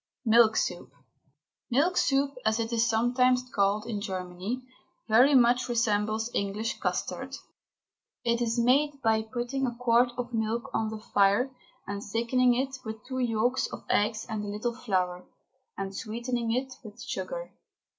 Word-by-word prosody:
MILK 225 -1 +6
SOUP. 175 -8 -1 0.8
Milk 300 +9 +2
soup, 275 0 +2
as 220 +1 +1
it 230 +1 -2
is 230 0 +2
sometimes 250 +2 +3
called 200 +1 +1
in 210 -4 -3
Germany, 190 +4 -4 0.4
very 250 +6 +6
much 245 0 +4
resembles 220 -1 0
English 205 +3 -2
custard. - - -3 0.9
It 235 0 +1
is 230 0 0
made 280 +4 +3
by 220 -1 +3
putting 245 +4 -2
a 240 - -4
quart 240 0 +3
of 245 -1 -4
milk 225 +1 -1
on 220 -1 0
the 220 - -5
fire 205 +4 +2 0.3
and 200 0 -4
thickening 240 +3 +2
it 265 +2 -2
with 220 -2 -7
two 260 0 -4
yolks 240 +1 +1
of - - -9
eggs 215 +2 +1
and 220 -3 -3
a - - -5
little 210 +4 -2
flour, 185 -7 -1 0.5
and 195 0 -4
sweetening 235 +2 -3
it 255 +2 -1
with 215 0 -11
sugar. - - -5
230 Hz, 150 wpm, -28 LUFS, 215-250 Hz, 0.9 s, MILK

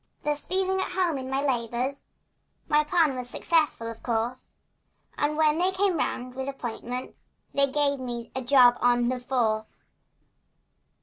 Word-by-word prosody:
Thus 295 -1 -2
feeling 380 0 +1
at - - -3
home 350 -6 +1
in 260 0 -6
my 270 +2 -1
labors, 250 +1 -2 0.6
My 300 0 +4
plan 305 -3 +2
was 250 -1 -5
successful, 310 -5 +1
of 230 0 -7
course, 235 +2 -3 0.6
And 295 +1 0
when 310 0 +3
they 365 +1 +3
came 380 -1 +1
round 250 -3 -2
with 265 +1 -4
appointments 250 -1 -6 0.2
They 280 0 +4
gave 280 0 +1
me 240 -2 -5
a 265 - -1
job 245 -1 +5
on 240 0 +3
"the 255 0 -2
force." 225 -4 -2
265 Hz, 150 wpm, -26 LUFS, 245-300 Hz, 0.6 s, job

